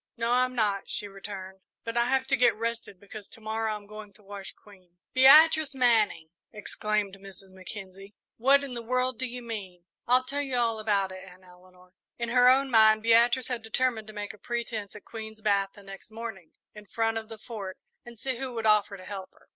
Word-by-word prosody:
"No, 230 +1 0
I'm 255 +1 +2
not," 205 -4 0
she 205 - -3
returned; 195 -1 -7 0.2
"but 230 0 -5
I 235 0 +3
have 265 +1 +1
to 265 - +4
get 245 -2 +4
rested, 230 -4 -4
because 205 0 -11
to - - -16
morrow 220 0 -2
I'm 205 -1 -10
going 210 0 -11
to 210 +2 -20
wash 200 -1 -9
Queen." 185 -4 -20 0.2
"Beatrice 300 +2 +7
Manning!" 220 -10 +2 0.2
exclaimed 210 -2 -2
Mrs. 195 -1 -10
Mackenzie. 195 +1 -10 0.2
"What 275 +4 +4
in 275 -3 -6
the 240 - -5
world 255 +1 -1
do 260 - -1
you 245 0 -7
mean?" 190 -7 -7 0.2
"I'll 250 +1 +5
tell 280 +3 -3
you 270 -3 -3
all 230 -2 +1
about 200 -3 0
it, 185 0 -9
Aunt 185 -1 -15
Eleanor." 180 0 -20 0.2
In 235 -1 -3
her 250 +1 +6
own 270 +1 +3
mind 220 -1 +6
Beatrice 235 +2 +4
had 245 -2 -2
determined 225 0 -1
to 215 - -10
make 205 -1 -5
a 210 - -17
pretence 230 -4 -4
at 210 - -12
Queen's 220 -1 -9
bath 200 -2 +1
the 205 - -14
next 195 +1 -11
morning, 220 -6 -8 0.2
in 210 -1 -13
front 225 +1 0
of 220 0 -12
the 225 - -8
Fort, 205 -4 -7 0.3
and 240 -1 -12
see 260 +2 -3
who 255 -1 -5
would 225 -1 -3
offer 210 -2 +3
to 185 - -12
help 195 -2 -7
her. - - -26
220 Hz, 210 wpm, -28 LUFS, 200-240 Hz, 0.3 s, Beatrice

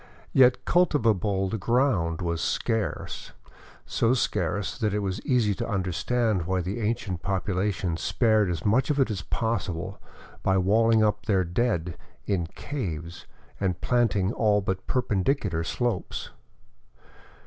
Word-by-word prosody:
Yet 125 -2 +5
cultivatable 110 - +2
ground 95 -7 +1
was 85 -1 -1
scarce, 110 -2 -2 0.5
so 115 +3 +2
scarce 100 -5 -1
that 105 -2 0
it 105 -1 -1
was 95 +2 -3
easy 120 -5 +2
to - - -4
understand 95 +1 0
why 95 0 +1
the 95 +7 -4
ancient 105 -5 -2
population 95 -2 -1
spared 110 0 +2
as 85 -3 -3
much 115 +8 +3
of 145 -1 +1
it 130 -4 +3
as 100 - -3
possible 95 -5 -3 0.4
by 95 - +2
walHng 110 +4 +4
up 105 0 -1
their 95 -3 +3
dead 90 -2 -1 0.3
in 90 -4 0
caves 85 - -6 0.3
and 95 -2 -1
planting 110 -5 +1
all 105 -4 +3
but 95 -1 -3
perpendicular 100 - 0
slopes. 120 +3 -2
100 Hz, 125 wpm, -26 LUFS, 90-115 Hz, 0.5 s, Yet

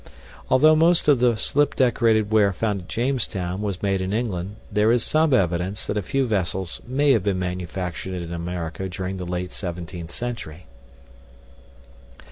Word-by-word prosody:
Although 155 +5 +6
most 165 +1 +3
of 145 -4 +5
the 120 -1 +3
slip 145 +5 +2
decorated 115 -4 +2
ware 105 -3 +4
found 105 -1 -1
at 90 - -14
Jamestown 110 -7 -2
was 100 -3 -3
made 95 -1 +1
in 95 +2 -2
England, 100 -4 -2 0.2
there 105 +2 +3
is 120 -1 +2
some 155 0 +2
evidence 90 -2 +1
that - - -2
a 105 - 0
few 135 +8 0
vessels 95 -5 -2
may 140 +3 +2
have 115 - +4
been 100 -1 0
manufactured 90 0 -4
in 85 0 -6
America 85 +1 -4
during 95 +1 -4
the 90 - -5
late 90 +1 -3
17th 85 -2 -6
century. 90 -6 -6
100 Hz, 160 wpm, -23 LUFS, 90-120 Hz, 0.2 s, Although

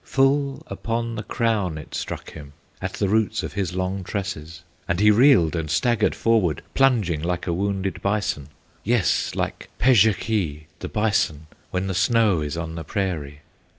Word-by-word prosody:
Full 135 0 +1
upon 115 +4 -3
the 110 - -4
crown 105 -7 0
it 75 - -10
struck - - -5
him, 75 -2 -11 0.3
At 95 0 -3
the 100 - 0
roots 110 +2 +1
of - - -5
his 95 -4 -2
long 95 +1 -2
tresses, 85 -5 -5 0.2
And 90 - 0
he 105 +1 +6
reeled 110 - +5
and 80 -2 -2
staggered 105 +10 +2
forward, 105 - +1
Plunging 110 - +2
like 85 +1 -2
a 85 - -1
wounded 95 +1 -2
bison, 100 -9 -1 0.3
Yes, 115 -3 +1
like - - -3
Pezhekee, 105 - +2
the - - -5
bison, 100 -8 0 0.2
When 90 +1 -2
the 95 - -2
snow 105 -3 +3
is 75 +1 -3
on 80 -1 -4
the 80 0 -5
prairie. 75 -5 -3
95 Hz, 160 wpm, -23 LUFS, 85-110 Hz, 0.3 s, he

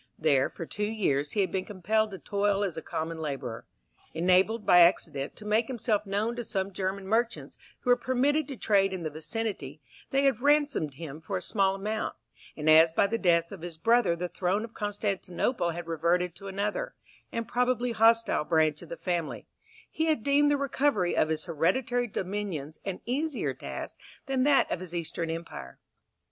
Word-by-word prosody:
There 140 -4 +3
for 165 - -7
two 210 +5 -3
years 145 -10 0
he 205 - +2
had 190 - 0
been 190 -1 -1
compelled 215 +3 0
to 195 - -7
toil 200 +1 0
as 185 -5 -2
a 160 - -4
common 160 +1 -4
labourer. 135 -7 -5 0.5
Enabled, 185 +6 +3
by 180 - +7
accident, 155 -5 +3
to 210 - -11
make 220 +2 +2
himself 220 -4 -1
known 210 +4 -1
to 240 - -3
some 195 -2 -2
German 190 +1 -3
merchants, 230 +3 -1 0.3
who 250 - +2
were - - +7
permitted 270 +4 +1
to 275 - -6
trade 195 -3 +2
in 185 -2 -4
the 155 - -3
vicinity, 155 -1 -4 0.3
they 275 +1 +2
had 270 -4 +2
ransomed 285 - +2
him 155 0 -8
for 190 +3 -3
a - - -5
small 195 -2 +1
amount; 215 +3 -3 0.4
and 150 0 -4
as 160 +1 +7
by 165 - +3
the 225 +3 -1
death 170 -2 +2
of 195 -4 -8
his 170 -2 -7
brother 230 0 +3
the 180 +1 -3
throne 185 +4 -1
of 230 0 -8
Constantinople 205 -1 -1
had 170 0 -5
reverted 170 +2 +1
to 195 +4 -11
another, 200 +2 -3 0.4
and 230 -1 -3
probably 245 0 +1
hostile, 230 -4 +4
branch 155 -1 +2
of 170 - -12
the 170 - -6
family, 175 -4 -3 0.4
he 320 - -2
had 310 -8 +1
deemed 285 +1 +4
the 290 - +3
recovery 275 -9 +1
of 155 - +2
his 160 -1 -1
hereditary 230 - 0
dominions 185 -7 -4
an 195 -2 -4
easier 285 +3 -1
task - - -7 0.3
than 270 -2 +1
that 285 -2 +4
of - - -1
his 175 -1 -7
Eastern 165 0 -3
empire. 160 - -6
195 Hz, 185 wpm, -28 LUFS, 165-230 Hz, 0.5 s, by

